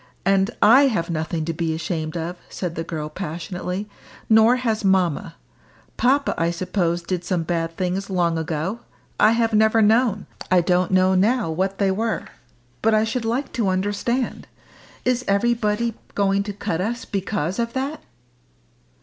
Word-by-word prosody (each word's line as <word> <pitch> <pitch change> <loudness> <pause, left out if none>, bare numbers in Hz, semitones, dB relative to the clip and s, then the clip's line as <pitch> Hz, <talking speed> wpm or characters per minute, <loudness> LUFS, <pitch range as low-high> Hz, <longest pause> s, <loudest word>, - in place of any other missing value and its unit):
And 195 +1 +3
I 260 +7 +7
have 170 -9 -1
nothing 160 0 -2
to 165 - -2
be 160 0 -1
ashamed 160 0 -3
of," 170 +2 -4
said 180 -3 -4
the 165 - -4
girl 155 -2 -4
passionately, 180 +3 -5 0.4
"nor 220 +2 +6
has 225 -4 -1
mamma. 180 -4 +1 0.6
Papa, 275 +3 +2
I 165 0 +2
suppose, 175 -1 -1
did 180 0 -3
some 175 -1 -1
bad 165 0 -2
things 185 +2 -2
long 175 -3 +1
ago. 160 +6 -2 0.4
I 215 +1 +6
have 230 -1 +1
never 220 +1 +4
known 220 -1 +3 0.2
I 185 -1 +5
don't 180 +1 +1
know 185 0 +3
now 210 0 +2
what 190 +4 -1
they 195 -2 +2
were. 220 +3 -1 0.6
But 220 0 +3
I 215 - +3
should 225 +1 -2
like 245 +5 -2
to 230 -5 0
understand. 205 +6 -1 0.6
Is 250 0 +1
everybody 230 +2 +1 0.2
going 200 0 +2
to 205 - -3
cut 180 -3 -3
us 235 +5 -3
because 195 -2 -2
of 235 0 -1
that?" 275 +4 -3
195 Hz, 160 wpm, -22 LUFS, 170-225 Hz, 0.6 s, I